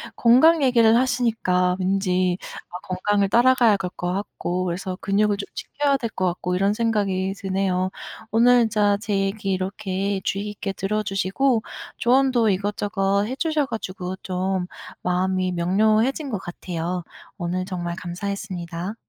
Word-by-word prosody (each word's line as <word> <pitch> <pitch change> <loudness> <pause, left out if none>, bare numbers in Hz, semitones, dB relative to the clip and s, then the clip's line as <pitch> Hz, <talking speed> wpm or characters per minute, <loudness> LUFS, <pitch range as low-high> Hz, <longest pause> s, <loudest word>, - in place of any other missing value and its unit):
건강 285 +7 +5
얘기를 230 -4 +5
하시니까 225 -8 +1
왠지 185 -1 +1 0.3
아 180 - -6
건강을 200 +2 +1
따라가야 240 -2 +5
갈 190 -2 -3
것 175 0 -2
같고 185 -2 -3
그래서 185 +1 -3
근육을 205 +1 +1
좀 200 - -4
지켜야 285 -1 0
될 235 -3 -3
것 185 -3 -2
같고 180 0 -1
이런 195 +2 +2
생각이 200 -4 0
드네요. 190 -1 -1 0.4
오늘 245 +2 +5
진짜 210 -2 +2
제 210 0 -3
얘기 195 +1 -1
이렇게 190 +1 -2
주의 200 +1 -2
깊게 205 -1 -4
들어 210 +3 -1
주시고 210 +5 +1 0.4
조언도 250 -2 +3
이것저것 200 0 0
해 255 - -4
주셔 310 -1 0
가지고 185 -6 -5
좀 185 0 -1 0.4
마음이 185 +1 0
명료해진 215 - +1
것 210 - -2
같아요. 175 -1 -4 0.3
오늘 180 +1 -2
정말 175 -2 -4
감사했습니다. 180 0 -5
195 Hz, 310 characters per minute, -23 LUFS, 185-220 Hz, 0.4 s, 건강